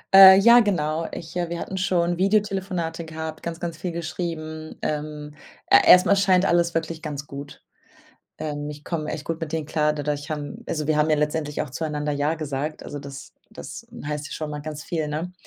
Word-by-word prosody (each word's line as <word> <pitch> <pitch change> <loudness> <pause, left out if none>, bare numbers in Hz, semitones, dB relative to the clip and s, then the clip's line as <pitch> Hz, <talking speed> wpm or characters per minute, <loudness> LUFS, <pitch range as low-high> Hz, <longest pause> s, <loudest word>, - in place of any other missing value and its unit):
Äh, 190 0 +11
ja, 235 +5 +8
genau. 165 -7 0
Ich, 165 +1 -8
äh 175 -1 -1
wir 170 - -3
hatten 190 - -5
schon 175 -2 +1
Videotelefonate 190 -4 0
gehabt, 160 0 -6
ganz, 170 0 -5
ganz 170 -2 -4
viel 180 +1 -4
geschrieben. 160 -1 -5
Ähm, 150 0 -4 0.3
er - - +6
erst 180 - +9
mal 200 - +5
scheint 195 -1 +3
alles 170 0 +2
wirklich 165 0 -2
ganz 145 -3 -5
gut. 140 0 -9 0.8
Ähm, 145 -1 -4
ich 150 0 -8
komme 155 -1 -3
echt 150 - -5
gut 165 0 -3
mit 160 -2 -5
denen 160 -2 -2
klar 150 -1 +1
dadurch 145 0 -3
haben 155 +10 -5
also 150 -2 -2
wir 155 - +3
haben 150 +1 +3
ja - - +5
letztendlich 150 0 -1
auch 150 - -7
zueinander 150 0 -3
„ja“ 145 +2 0
gesagt. 150 -1 -4
Also, 145 - -6
das 140 -1 -9 0.2
das - - -9 0.2
heißt 150 0 -3
ja - - -9
schon 155 -1 -4
mal 150 - -4
ganz 150 0 -6
viel, 160 -3 -2
ne? 155 +4 -4
155 Hz, 200 wpm, -24 LUFS, 150-170 Hz, 0.8 s, Äh